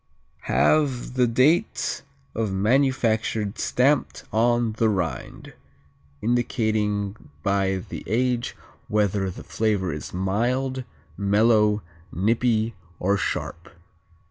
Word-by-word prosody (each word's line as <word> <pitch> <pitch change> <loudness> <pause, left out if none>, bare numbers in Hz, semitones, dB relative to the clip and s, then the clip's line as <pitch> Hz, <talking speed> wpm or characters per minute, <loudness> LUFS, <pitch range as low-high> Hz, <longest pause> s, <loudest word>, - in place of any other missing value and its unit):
_ - - -15
Have 135 -6 +2
the 125 -1 +3
date 130 +8 +2 0.3
of 110 -3 -1
manufacture 110 -1 +1
stamped 135 +3 +1
on 120 +1 +2
the 110 0 +2
rind, 90 -6 -3 0.7
indicating 110 - 0
by 95 -1 +1
the - - -7
age 120 +2 0 0.3
whether 100 -2 +1
the 90 - -8
flavor 100 -6 0
is 75 - -6
"mild, 125 +8 -1 0.3
mellow, 105 +1 +3 0.3
nippy, 115 +3 +1 0.3
or 100 +2 +2
sharp." 85 -3 -3
110 Hz, 95 wpm, -24 LUFS, 100-120 Hz, 0.7 s, the